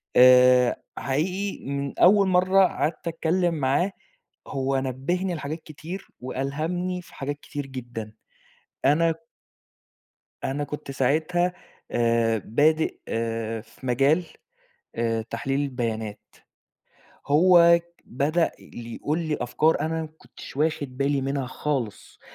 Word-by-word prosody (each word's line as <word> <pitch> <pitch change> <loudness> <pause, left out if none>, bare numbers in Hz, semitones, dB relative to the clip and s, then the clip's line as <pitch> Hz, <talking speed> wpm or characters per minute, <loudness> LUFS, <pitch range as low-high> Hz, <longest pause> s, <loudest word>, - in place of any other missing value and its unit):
آآ 125 0 +7 0.2
حقيقي 180 +9 -2
من 140 0 -4
أول 195 +2 +6
مرّة 185 +1 +4
قعدت 170 -1 -2
أتكلّم 170 +1 +1
معاه، 150 +7 +1 0.6
هو 135 0 -1
نبّهني 160 +8 -2
لحاجات 155 +2 -5
كتير 165 +5 -8
وألهمني 160 +8 -2
في - - -17
حاجات 145 +1 -4
كتير 145 -1 -6
جدًا. 120 -4 -7 0.7
أنا 160 +3 +4 1.3
أنا 145 +2 -1
كنت 145 -1 -6
ساعتها 160 +7 +1 0.4
آآ 115 -1 +2
بادئ 155 +7 +2 0.7
في 110 +1 -21
مجال 135 +7 +2 0.7
آآ 115 -1 0
تحليل 130 +5 -2
البيانات. 115 -6 -3 1.1
هو 170 +2 +6
ك 170 0 -32
بدأ 155 +7 +1
ل 120 -1 -10
يقول 150 +7 -2
لي 155 -3 -1
أفكار 155 +6 +2
أنا 160 +1 -1
ما 160 - -6
كنتش - - -12
واخد 145 -4 -1
بالي 140 0 +1
منها 135 -1 -2
خالص. 130 -5 -4
145 Hz, 115 wpm, -25 LUFS, 130-170 Hz, 1.3 s, آآ